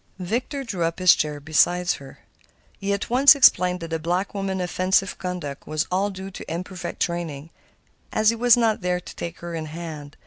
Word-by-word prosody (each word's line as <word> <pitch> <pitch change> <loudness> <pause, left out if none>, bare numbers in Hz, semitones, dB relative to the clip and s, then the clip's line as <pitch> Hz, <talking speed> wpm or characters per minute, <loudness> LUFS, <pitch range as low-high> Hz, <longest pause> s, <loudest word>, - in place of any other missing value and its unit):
Victor 240 +9 -3
drew 200 -8 -5
up 165 0 -1
his 185 -1 +6
chair 150 -1 -2
beside 175 +4 +2
her. 135 -1 -8 0.6
He 200 0 -2
at 200 +3 -2
once 270 +4 +7
explained 180 -9 +4
that 165 - -6
the 165 0 -2
black 175 +5 -1
woman's 195 -2 -2
offensive 185 +2 0
conduct 175 -7 -5
was 155 0 -1
all 195 +3 +1
due 190 0 -8
to 185 - -9
imperfect 180 +2 -5
training, 165 -3 -3 0.6
as 215 0 +3
he - - -3
was 240 +1 +5
not 225 -3 +1
there 180 0 0
to - - -11
take 170 0 -7
her 170 0 -6
in 160 -1 -4
hand. 155 -2 -8
180 Hz, 195 wpm, -23 LUFS, 165-195 Hz, 0.6 s, once